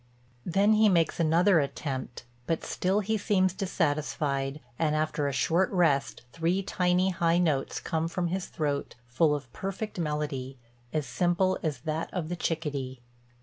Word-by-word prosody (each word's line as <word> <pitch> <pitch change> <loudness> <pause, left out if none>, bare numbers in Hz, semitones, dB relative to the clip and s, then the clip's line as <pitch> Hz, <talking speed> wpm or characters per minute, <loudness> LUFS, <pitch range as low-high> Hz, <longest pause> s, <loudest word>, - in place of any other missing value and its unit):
Then 200 +5 +4
he 215 0 +5
makes 170 -3 +2
another 170 +3 +4
attempt; 135 -3 -4 0.2
but 165 - -1
still 190 +3 0
he 220 +2 -1
seems 185 -2 +2
dissatisfied 150 -6 -1 0.2
and, 155 -2 +2
after 155 -1 0
a - - 0
short 165 +7 +2
rest, 145 -9 +1
three 170 +4 0
tiny 180 -1 +2
high 170 -1 +2
notes 155 -6 +1
come 160 0 -1
from 175 0 -2
his 185 +1 -2
throat, 145 -2 -2
full 150 +5 +3
of 135 -5 -8
perfect 195 +1 -4
melody, 150 -4 -3 0.3
as 155 -2 -1
simple 180 +3 +1
as 150 -6 -2
that 160 +1 -3
of 170 -4 -3
the 175 - -2
chickadee." 145 -7 -3
165 Hz, 150 wpm, -28 LUFS, 145-185 Hz, 0.3 s, he